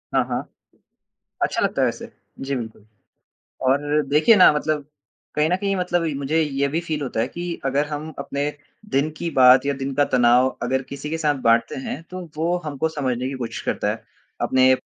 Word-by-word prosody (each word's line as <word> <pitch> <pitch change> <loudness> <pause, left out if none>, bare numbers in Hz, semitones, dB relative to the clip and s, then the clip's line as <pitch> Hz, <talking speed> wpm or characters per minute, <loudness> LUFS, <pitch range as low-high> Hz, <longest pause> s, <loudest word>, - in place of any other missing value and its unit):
हाँ, - - +4
हाँ। - - -2 1.0
अच्छा - - 0
लगता - - 0
है - - +4
वैसे, - - -4 0.3
जी, 135 +1 -2
बिल्कुल। 110 -4 -7 0.8
और 145 +3 +2
देखिए 155 +10 +5
ना 185 - +8
मतलब 150 -1 -1 0.5
कहीं 150 +1 +2
न 180 - +3
कहीं 195 0 -1
मतलब 175 -2 0
इ 155 - -1
मुझे 140 +4 0
ये 140 -1 0
भी 155 +4 -1
फील 155 -3 -3
होता 125 -4 -2
है 120 - 0
कि 175 +1 -5
अगर 140 +2 +1
हम 150 +1 -5
अपने 145 +1 -2 0.4
दिन 140 +3 +1
की 170 - -3
बात 130 -1 +6
या 140 - +2
दिन 135 0 -4
का 145 +1 +3
तनाव 125 0 +4
अगर 130 +2 0
किसी 140 +3 -7
के 160 - -2
साथ 150 -2 +2
बाँटते 115 0 +3
हैं, 140 +3 -5
तो 185 0 -6 0.2
वो 170 +3 +1
हमको 150 +1 -1
समझने 130 -5 -2
की 135 - -4
कोशिश 120 -3 -5
करता - - 0
है। - - -5 0.4
अपने 130 0 +4
145 Hz, 200 wpm, -22 LUFS, 130-155 Hz, 1.0 s, ना